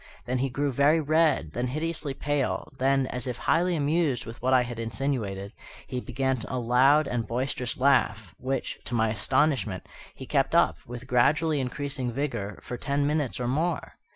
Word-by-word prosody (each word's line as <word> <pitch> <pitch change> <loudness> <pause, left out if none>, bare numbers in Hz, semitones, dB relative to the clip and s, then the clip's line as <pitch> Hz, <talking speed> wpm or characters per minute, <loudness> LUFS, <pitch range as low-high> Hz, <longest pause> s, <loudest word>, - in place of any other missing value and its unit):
Then 125 +1 -1
he 135 +1 0
grew 140 +3 -1
very 145 +5 +4
red, 155 - +2
then 120 +7 -2
hideously 155 0 -3
pale, 145 -1 -1
then, 135 +1 +3
as 125 0 -4
if 125 - -3
highly 175 +2 +2
amused 150 -3 +1
with 115 +1 -9
what 130 +2 +1
I 130 -1 +5
had 120 -1 -6
insinuated, 115 -5 -3 0.3
he 125 - -4
began 130 -1 -1
a 130 - -3
loud 130 +5 +4
and 120 -3 -2
boisterous 125 0 -2
laugh, 110 -8 +2
which, 130 0 -3
to 120 - -3
my 110 -1 +2
astonishment, 125 -2 +1 0.3
he - - -8
kept - - +1
up, - - +4
with 120 +1 -7
gradually 150 +5 +3
increasing 130 -1 -3
vigour, 115 -7 -3
for 125 - -5
ten 140 +3 0
minutes 145 -4 -1
or 120 - -1
more. 160 +6 -1
130 Hz, 175 wpm, -27 LUFS, 120-145 Hz, 0.3 s, I